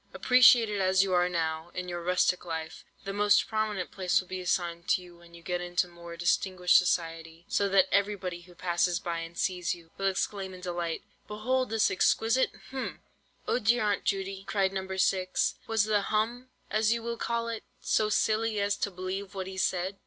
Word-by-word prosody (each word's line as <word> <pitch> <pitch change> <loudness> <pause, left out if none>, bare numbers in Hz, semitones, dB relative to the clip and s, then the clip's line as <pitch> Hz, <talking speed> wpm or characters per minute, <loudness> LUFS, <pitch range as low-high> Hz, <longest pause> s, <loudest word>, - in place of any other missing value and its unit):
Appreciated 240 -5 +5
as 190 0 +4
you 190 -1 -1
are 180 0 +3
now 160 -1 -2
in 180 0 -4
your 175 -1 -4
rustic 180 +1 +1
life, 160 -2 -5 0.2
the 195 - -4
most 205 0 +3
prominent 215 -4 -2
place 185 -2 +1
will 185 - -7
be 185 0 -5
assigned 175 -1 -1
to - - +3
you 175 -1 -14
when 170 0 -17
you 170 - -14
get 180 0 -2
into 175 0 0
more 170 -1 -11
distinguished 180 +1 +2
society; 165 -1 -2
so 200 -1 +1
that 190 -1 +5
everybody 195 -3 0
who 175 0 -17
passes 175 0 0
by 170 -2 -3
and 165 +1 -8
sees 180 -2 -1
you, 165 -1 -18
will 195 - +1
exclaim 195 0 -2
in 180 - -12
delight, 175 -2 -3 0.2
'Behold 255 +5 -1
this 220 -1 +2
exquisite—hm—!'" 255 +6 0 0.5
"Oh - - +1
dear, 235 +1 +2
Aunt 205 -1 0
Judy," 195 -1 -2
cried 195 -2 +1
No. 190 -1 -3
6, 185 -1 +1
"was 225 -2 +2
the 210 -1 +2
'hum,' 235 +5 -1 0.2
as 215 +1 +2
you 230 0 0
will 235 0 -3
call 230 0 -2
it, 230 -1 -4 0.2
so 215 -1 +1
silly 215 0 +1
as 200 0 +1
to 205 - -1
believe 190 +2 -5
what 190 -1 -3
he 190 0 -7
said?" 190 +1 -1
190 Hz, 190 wpm, -29 LUFS, 175-210 Hz, 0.5 s, Appreciated